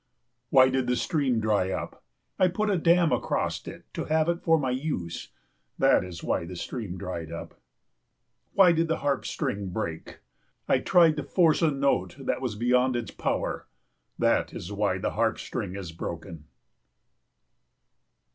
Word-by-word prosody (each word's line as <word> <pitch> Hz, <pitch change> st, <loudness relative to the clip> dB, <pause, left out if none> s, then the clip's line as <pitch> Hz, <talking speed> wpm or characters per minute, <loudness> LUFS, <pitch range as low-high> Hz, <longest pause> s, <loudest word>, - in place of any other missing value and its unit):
Why 130 Hz, -1 st, +6 dB
did 130 Hz, -1 st, 0 dB
the 125 Hz, -, +2 dB
stream 135 Hz, -5 st, 0 dB
dry 105 Hz, -4 st, +1 dB
up? -, -, -5 dB, 0.4 s
I 185 Hz, -, +5 dB
put 210 Hz, +4 st, 0 dB
a -, -, +2 dB
dam 170 Hz, 0 st, +4 dB
across -, -, -1 dB
it -, -, -9 dB
to -, -, -3 dB
have 155 Hz, 0 st, +2 dB
it 170 Hz, 0 st, -1 dB
for 165 Hz, -1 st, +4 dB
my 135 Hz, -4 st, -1 dB
use, 130 Hz, -, -3 dB, 0.5 s
that -, -, +4 dB
is 90 Hz, -3 st, -8 dB
why -, -, 0 dB
the 90 Hz, +2 st, -7 dB
stream 95 Hz, +1 st, -5 dB
dried 85 Hz, -3 st, -5 dB
up. 85 Hz, -, -8 dB, 0.9 s
Why 190 Hz, -3 st, +7 dB
did 165 Hz, 0 st, +1 dB
the 160 Hz, -, 0 dB
harp 140 Hz, -2 st, 0 dB
string 100 Hz, -1 st, -2 dB
break? 85 Hz, -4 st, -5 dB, 0.5 s
I -, -, +3 dB
tried 165 Hz, -3 st, +4 dB
to 150 Hz, -, -2 dB
force 170 Hz, -4 st, +3 dB
a 165 Hz, -, +4 dB
note 140 Hz, -1 st, 0 dB
that 135 Hz, -, -2 dB
was 125 Hz, -5 st, -2 dB
beyond 125 Hz, +3 st, +2 dB
its 120 Hz, -2 st, -3 dB
power, -, -, -2 dB, 0.5 s
that -, -, +1 dB
is 90 Hz, -, -6 dB
why 100 Hz, -2 st, 0 dB
the 95 Hz, -, -2 dB
harp -, -, +1 dB
string 90 Hz, -, -5 dB
is 95 Hz, -4 st, -6 dB
broken. 85 Hz, -1 st, -7 dB
125 Hz, 165 wpm, -27 LUFS, -, 0.9 s, Why